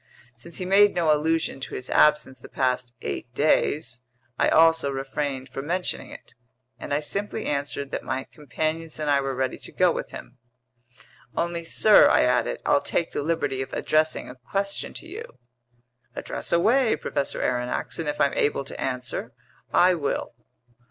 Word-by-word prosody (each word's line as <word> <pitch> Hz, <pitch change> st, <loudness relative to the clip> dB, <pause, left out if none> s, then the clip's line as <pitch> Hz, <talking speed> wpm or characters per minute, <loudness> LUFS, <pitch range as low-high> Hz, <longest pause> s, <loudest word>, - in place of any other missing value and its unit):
Since 120 Hz, +9 st, -9 dB
he 185 Hz, -, -3 dB
made 200 Hz, +2 st, +5 dB
no 165 Hz, -3 st, +3 dB
allusion 160 Hz, -1 st, 0 dB
to 135 Hz, -, -6 dB
his 125 Hz, -, -5 dB
absence 150 Hz, -3 st, +3 dB
the -, -, -12 dB
past 125 Hz, -2 st, -1 dB
eight 120 Hz, -, -4 dB
days, 150 Hz, -3 st, +1 dB, 0.4 s
I -, -, +4 dB
also 165 Hz, -2 st, +5 dB
refrained 135 Hz, 0 st, -3 dB
from 135 Hz, +2 st, -6 dB
mentioning 180 Hz, +2 st, -1 dB
it, -, -, -12 dB, 0.5 s
and -, -, -7 dB
I 145 Hz, +1 st, +1 dB
simply 205 Hz, +7 st, -3 dB
answered 140 Hz, -1 st, -2 dB
that -, -, -3 dB
my 130 Hz, 0 st, -2 dB
companions 155 Hz, +3 st, -4 dB
and 150 Hz, -1 st, -1 dB
I 140 Hz, -1 st, +3 dB
were 135 Hz, -1 st, -3 dB
ready 130 Hz, 0 st, -2 dB
to -, -, -9 dB
go -, -, +3 dB
with -, -, -4 dB
him. 125 Hz, +1 st, -11 dB, 1.0 s
"Only, 170 Hz, 0 st, -1 dB
sir," 210 Hz, +5 st, +6 dB
I -, -, +4 dB
added, 125 Hz, 0 st, +1 dB
"I'll 140 Hz, -, +3 dB
take 170 Hz, -, -1 dB
the -, -, -2 dB
liberty 145 Hz, -4 st, -1 dB
of 135 Hz, -, -6 dB
addressing 155 Hz, 0 st, +1 dB
a -, -, -8 dB
question 195 Hz, -, -3 dB
to -, -, -9 dB
you." 410 Hz, +8 st, -9 dB, 0.8 s
"Address -, -, -4 dB
away, 225 Hz, +8 st, +3 dB
Professor 140 Hz, -, -2 dB
Aronnax, 125 Hz, +4 st, -2 dB
and 160 Hz, -2 st, -2 dB
if 150 Hz, -, -4 dB
I'm 140 Hz, -, +3 dB
able 145 Hz, -1 st, +1 dB
to 135 Hz, -, -9 dB
answer, 125 Hz, -1 st, -3 dB, 0.4 s
I 180 Hz, +1 st, +5 dB
will." 155 Hz, -5 st, -2 dB
150 Hz, 170 wpm, -25 LUFS, 135-170 Hz, 1.0 s, sir